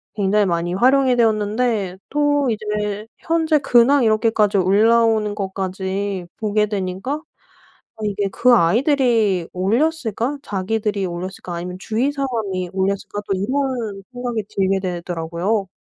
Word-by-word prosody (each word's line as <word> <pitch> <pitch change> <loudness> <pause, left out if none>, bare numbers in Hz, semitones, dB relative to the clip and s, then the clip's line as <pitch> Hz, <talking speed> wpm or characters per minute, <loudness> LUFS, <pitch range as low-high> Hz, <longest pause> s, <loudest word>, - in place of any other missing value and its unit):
굉장히 205 0 +2
많이 175 -1 -1
활용이 260 +3 +4
되었는데 215 -3 +1
또 290 -1 +1
이제 210 -1 -3
현재 325 -1 +1
근황 265 +1 +4
이렇게까지 215 -2 +2
올라오는 215 +2 +3
것까지 190 -1 -3
보게 210 -1 +1
되니까 195 +4 -3 0.8
아 - - -15
이게 205 -1 -1
'그 250 0 +4
아이들이 225 - +2
올렸을까? 235 - 0
자기들이 205 -1 -2
올렸을까 180 +1 -6
아니면 180 +1 -5
주위 225 +8 -1
사람이 220 -10 -3
올렸을까?' 195 +2 -2
또 195 - 0
이런 235 -3 -2
생각이 245 -3 -3
들게 195 -2 0
되더라고요. 175 +2 -2
210 Hz, 305 characters per minute, -20 LUFS, 190-240 Hz, 0.8 s, 활용이